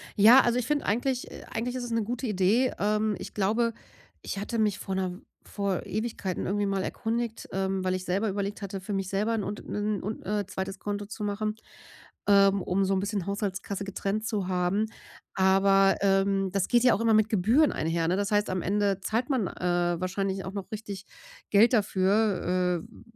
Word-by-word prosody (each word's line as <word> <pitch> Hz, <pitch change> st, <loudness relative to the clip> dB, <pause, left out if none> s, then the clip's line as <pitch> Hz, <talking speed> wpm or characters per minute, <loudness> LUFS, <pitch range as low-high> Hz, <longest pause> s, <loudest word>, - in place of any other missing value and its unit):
Ja. 225 Hz, +6 st, +8 dB
Also, 240 Hz, +1 st, +1 dB
ich 245 Hz, -, -3 dB
finde 295 Hz, 0 st, 0 dB
eigentlich 245 Hz, +4 st, 0 dB
äh, -, -, -9 dB
eigentlich 245 Hz, +2 st, -3 dB
ist 255 Hz, -, -3 dB
es 240 Hz, -, -5 dB
'ne 230 Hz, -1 st, +1 dB
gute 245 Hz, +4 st, -3 dB
Idee. 210 Hz, +6 st, +2 dB
Ähm, 210 Hz, +1 st, +1 dB
ich -, -, -8 dB
glaube, 225 Hz, +4 st, +1 dB, 0.5 s
ich -, -, -5 dB
hatte 210 Hz, +3 st, -3 dB
mich 210 Hz, -3 st, +1 dB
vor 190 Hz, -, -4 dB
'ner 185 Hz, -1 st, -2 dB, 0.2 s
vor 200 Hz, -3 st, -2 dB
Ewigkeiten 210 Hz, -3 st, -3 dB
irgendwie 205 Hz, +1 st, 0 dB
mal 195 Hz, -1 st, -1 dB
erkundigt, 230 Hz, +1 st, -3 dB
ähm, 190 Hz, 0 st, -1 dB
weil 185 Hz, 0 st, +1 dB
ich 185 Hz, -, -4 dB
selber 190 Hz, +5 st, 0 dB
überlegt 200 Hz, +1 st, -3 dB
hatte, 195 Hz, -1 st, -5 dB
für 185 Hz, -, -7 dB
mich 195 Hz, -1 st, -2 dB
selber 210 Hz, +4 st, 0 dB
'n 220 Hz, -2 st, -1 dB
Unt 205 Hz, +2 st, -6 dB
'nen 210 Hz, -1 st, -2 dB
Un 210 Hz, +3 st, -4 dB
äh, 205 Hz, -1 st, -1 dB
2. 190 Hz, 0 st, -5 dB
Konto 205 Hz, 0 st, -3 dB
zu 210 Hz, +1 st, -7 dB
machen, 215 Hz, +1 st, -2 dB, 0.7 s
ähm, 200 Hz, -1 st, +5 dB
um 195 Hz, +2 st, +1 dB
so 195 Hz, +1 st, +1 dB
'n 190 Hz, -, +1 dB
bisschen 200 Hz, -2 st, -2 dB
Haushaltskasse 200 Hz, 0 st, -3 dB
getrennt 200 Hz, +2 st, -3 dB
zu 205 Hz, -5 st, -1 dB
haben. 185 Hz, +3 st, +1 dB, 0.5 s
Aber, 195 Hz, +1 st, +4 dB
ähm, 195 Hz, 0 st, +2 dB
das 195 Hz, -1 st, 0 dB
geht 240 Hz, 0 st, +3 dB
ja 250 Hz, -, +6 dB
auch -, -, -2 dB
immer 230 Hz, -1 st, +3 dB
mit 215 Hz, 0 st, +4 dB
Gebühren 230 Hz, -, +3 dB
einher, 165 Hz, +1 st, -1 dB
ne? 180 Hz, -, +2 dB
Das 200 Hz, +2 st, -1 dB
heißt, 210 Hz, 0 st, +1 dB
am 185 Hz, -1 st, -1 dB
Ende 200 Hz, 0 st, +1 dB
zahlt 230 Hz, +7 st, -1 dB
man, 240 Hz, -9 st, +1 dB
äh, 175 Hz, -1 st, 0 dB
wahrscheinlich 190 Hz, +1 st, -2 dB
auch 190 Hz, -, -5 dB
noch 200 Hz, -2 st, -6 dB
richtig 205 Hz, -3 st, -6 dB, 0.4 s
Geld 215 Hz, +4 st, +5 dB
dafür, 185 Hz, -4 st, +1 dB
äh -, -, -26 dB
w -, -, -16 dB
200 Hz, 200 wpm, -28 LUFS, 190-215 Hz, 0.7 s, Ja